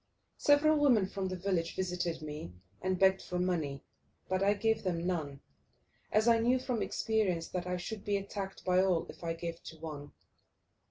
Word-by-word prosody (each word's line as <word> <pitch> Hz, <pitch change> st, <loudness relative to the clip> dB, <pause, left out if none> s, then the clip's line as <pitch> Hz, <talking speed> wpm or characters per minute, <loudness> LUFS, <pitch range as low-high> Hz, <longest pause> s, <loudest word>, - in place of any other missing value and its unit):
Several 295 Hz, +1 st, +5 dB
women 245 Hz, -9 st, +5 dB
from 195 Hz, -1 st, -3 dB
the 185 Hz, -, -3 dB
village 180 Hz, -2 st, -1 dB
visited 180 Hz, -3 st, -2 dB
me 150 Hz, -, -6 dB, 0.3 s
and 185 Hz, 0 st, 0 dB
begged 190 Hz, +1 st, +4 dB
for 180 Hz, -, -4 dB
money, 160 Hz, -7 st, -1 dB, 0.4 s
but 185 Hz, 0 st, 0 dB
I 200 Hz, +1 st, +4 dB
gave 220 Hz, +2 st, +1 dB
them 175 Hz, -3 st, -1 dB
none, 150 Hz, -6 st, -2 dB, 0.7 s
as 215 Hz, +2 st, +3 dB
I 230 Hz, -1 st, +6 dB
knew 245 Hz, +3 st, +3 dB
from 250 Hz, -3 st, -2 dB
experience 205 Hz, -7 st, 0 dB
that 180 Hz, -1 st, -3 dB
I 180 Hz, 0 st, -1 dB
should 200 Hz, +3 st, -6 dB
be 205 Hz, -1 st, +1 dB
attacked 195 Hz, 0 st, -6 dB
by 185 Hz, 0 st, +4 dB
all 185 Hz, -3 st, +2 dB
if -, -, -11 dB
I 165 Hz, 0 st, -1 dB
gave 170 Hz, 0 st, -5 dB
to 160 Hz, -, -10 dB
one. 150 Hz, -2 st, -7 dB
185 Hz, 180 wpm, -32 LUFS, 170-205 Hz, 0.7 s, I